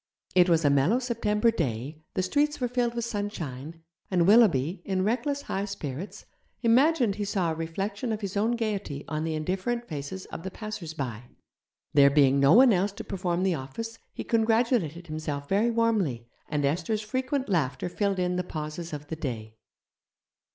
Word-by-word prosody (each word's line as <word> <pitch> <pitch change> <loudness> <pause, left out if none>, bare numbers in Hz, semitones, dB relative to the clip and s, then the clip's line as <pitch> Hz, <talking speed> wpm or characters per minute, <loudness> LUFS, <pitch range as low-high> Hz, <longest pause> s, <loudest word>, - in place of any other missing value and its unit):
It 180 0 +5
was 165 -2 +3
a 145 - +5
mellow 140 - +3
September 230 -3 +1
day, 140 - -3
the 185 - +1
streets 295 +10 +1
were 250 - 0
filled 240 -1 0
with 235 -1 -1
sunshine, 165 - -5 0.3
and 175 -3 +3
Willoughby, 185 - +4
in 190 -1 -1
reckless 280 +7 0
high 195 +1 -2
spirits, 175 -3 -6 0.4
imagined 245 -2 +4
he 210 - -1
saw 195 -5 0
a - - -1
reflection 195 +8 -3
of 215 0 -3
his 200 -1 -4
own 220 +4 +2
gaiety 205 -11 -3
on 155 0 -2
the 160 -1 -1
indifferent 190 +10 -2
faces 155 +5 -6
of - - -5
the 190 - -5
passersby. 160 - -5 0.7
There 140 -1 +7
being 140 -1 +4
no 140 +3 +6
one 245 +1 +7
else 195 +2 +1
to - - -7
perform 180 -2 -2
the 190 -1 +2
office, 225 +12 -6
he - - -6
congratulated 225 - +1
himself 155 -3 -4
very 205 +7 +2
warmly, 215 - +1 0.2
and 150 -2 0
Esther's 175 +9 0
frequent 260 +4 -2
laughter 145 -8 0
filled 200 +2 -1
in 180 0 0
the 180 - 0
pauses 155 0 -6
of 150 0 -6
the 160 - -5
day. 115 -8 -5
185 Hz, 170 wpm, -27 LUFS, 155-225 Hz, 0.7 s, There